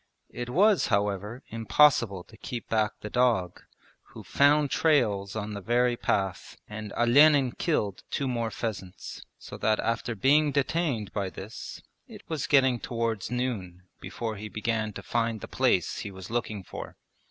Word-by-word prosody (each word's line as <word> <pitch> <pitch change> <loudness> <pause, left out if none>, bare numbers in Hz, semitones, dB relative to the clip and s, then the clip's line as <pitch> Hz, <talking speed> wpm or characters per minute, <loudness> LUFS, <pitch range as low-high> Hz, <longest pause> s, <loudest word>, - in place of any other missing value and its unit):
It 120 0 -5
was 200 - +4
however 105 +4 -1
impossible 115 -4 +3
to 110 - -17
keep 120 0 -6
back 110 -1 +1
the 105 - -6
dog, 115 -8 +1 0.4
who - - -13
found 145 0 +3
trails 105 -11 +2
on 105 -1 -4
the 100 - -5
very 120 +3 +2
path, 95 -5 -2
and 105 -1 -7
Olenin 135 +2 +5
killed 105 - -1
two 140 - -2
more 115 -3 -1
pheasants, 100 -5 -6
so - - -10
that 110 -1 +2
after 115 0 -1
being 145 +8 +4
detained 140 - -1
by 100 -2 -2
this 100 +4 -9 0.2
it - - -13
was 160 -4 -3
getting 130 -4 +4
towards 115 -4 -2
noon 110 -8 -3 0.2
before 110 -3 -5
he 105 +1 -7
began 110 0 -2
to - - -8
find 115 -1 -1
the - - -8
place - - +1
he 105 - -5
was 95 0 -10
looking 110 -4 -2
for. - - -9
115 Hz, 155 wpm, -28 LUFS, 105-130 Hz, 0.4 s, Olenin